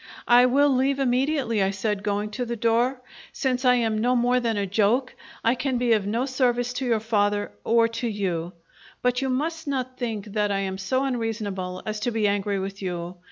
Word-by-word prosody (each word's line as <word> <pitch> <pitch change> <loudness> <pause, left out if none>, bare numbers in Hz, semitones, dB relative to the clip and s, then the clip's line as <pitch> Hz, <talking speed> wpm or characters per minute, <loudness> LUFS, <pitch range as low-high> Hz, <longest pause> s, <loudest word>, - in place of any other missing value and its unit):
"I 245 +1 +7
will 285 +3 +4
leave 270 +2 +2
immediately," 260 -3 +1
I 190 - +2
said, 200 +1 -2
going 205 +1 -2
to 245 +4 -3
the 235 0 -3
door. 235 +3 +1 0.3
"Since 255 -2 -1
I 250 0 +6
am 225 -3 0
no 245 +3 +2
more 245 +1 +3
than 230 -3 -1
a 200 - 0
joke, 215 +6 +1 0.3
I 230 - +4
can 255 0 -1
be 240 -1 +2
of 205 -3 +1
no 230 +5 0
service 245 -2 0
to 255 +1 -3
your 230 -3 +2
father 205 -2 0
or 230 0 +4
to 230 +1 -4
you; 180 -5 -2 0.5
but 250 +1 +1
you 265 - -1
must 320 +5 -2
not 255 -2 -3
think 225 -5 -3
that 210 -1 +1
I 195 0 0
am 190 -1 -3
so 260 +8 0
unreasonable 215 -7 -3
as 215 0 -3
to 230 - -1
be 220 -3 +1
angry 200 0 0
with 195 +1 -5
you. 175 -1 -4
230 Hz, 205 wpm, -25 LUFS, 205-250 Hz, 0.5 s, I